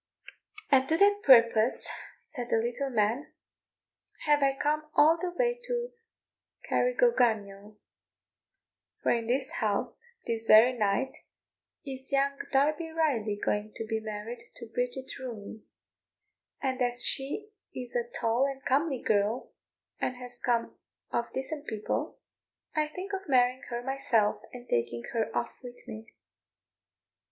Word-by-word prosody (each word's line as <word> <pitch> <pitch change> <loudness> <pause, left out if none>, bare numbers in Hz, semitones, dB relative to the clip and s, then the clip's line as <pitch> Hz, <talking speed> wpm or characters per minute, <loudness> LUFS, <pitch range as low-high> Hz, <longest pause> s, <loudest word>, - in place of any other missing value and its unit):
"And 270 -1 +4
to 320 - +4
that 405 +1 +4
purpose," 230 -3 +6 0.4
said 245 -5 -6
the - - +3
little 240 +4 -1
man, 230 +3 0 0.9
"have 295 -1 +4
I 275 -1 +2
come 305 +1 0
all 315 +2 +6
the 365 - -1
way 485 +7 0
to 485 -1 -2 0.8
Carrigogunniel; 220 - +1 1.3
for - - +3
in 230 -1 0
this 260 +2 0
house, 215 - 0 0.2
this 225 -1 -1
very 225 +4 +8
night, 215 +3 0 0.7
is 265 -1 -6
young 275 0 +2 0.2
Darby 305 +4 +2
Riley 280 -10 0
going 210 +1 -1
to 225 - -4
be 220 0 -1
married 220 +2 -7
to 230 -2 -9
Bridget 250 +2 -3
Rooney; 220 -4 -7 1.0
and 260 -1 -2
as 245 0 +1
she 295 +11 0 0.2
is 250 -1 -5
a 240 0 -1
tall 240 +3 +1
and 270 -1 -7
comely 275 0 +1
girl, 210 +3 +1 0.5
and 250 - -1
has 245 -1 -8
come 235 -1 -1 0.3
of 235 - -1
decent 290 +3 -4
people, 215 -1 -3 0.6
I 305 -1 +2
think 370 +6 -7
of 385 -4 -4
marrying 255 -1 +3
her 240 0 -4
myself, 240 -6 +1
and 245 0 -10
taking 120 0 -1
her 225 -2 0
off 120 - -2
with 245 -1 -11
me." 220 0 -8
250 Hz, 135 wpm, -29 LUFS, 225-285 Hz, 1.3 s, very